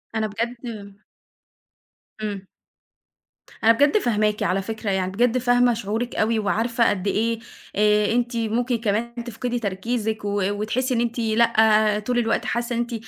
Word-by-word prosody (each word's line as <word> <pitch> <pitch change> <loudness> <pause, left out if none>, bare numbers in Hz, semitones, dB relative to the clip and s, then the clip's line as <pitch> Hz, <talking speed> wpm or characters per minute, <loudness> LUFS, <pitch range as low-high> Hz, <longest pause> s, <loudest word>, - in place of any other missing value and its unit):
أنا 220 -1 0
بجد 230 +4 -3
آآ 205 -3 -9 1.2
امم. 205 -3 -4 1.2
أنا 225 - +7
بجد 285 - +4
فاهماكِ، 215 - +1
على 195 +1 +1
فكرة 220 +1 -4
يعني 190 -1 -1
بجد 240 +5 +2
فاهمة 245 0 +3
شعورِك 225 +2 -3
أوي 220 +1 +1
وعارفة 230 +3 +1
قد 200 -1 -2
إيه، 225 +3 0 0.4
آآ، 210 0 +3
أنتِ 240 0 0
ممكن 235 +2 0
كمان 225 +1 -1
تفقدي 245 +1 -3
تركيزِك 215 +1 -2
و 205 0 -1
وتحسّي 225 +6 -1
إن 235 - +1
أنتِ 235 0 -2
لأ 225 0 +2
آآ، 215 -2 +3
طول 245 +4 -2
الوقت 230 -1 0
حاسّة 240 +1 -2
إن - - -1
أنتِ، 240 0 -2
225 Hz, 155 wpm, -23 LUFS, 210-240 Hz, 1.2 s, أنا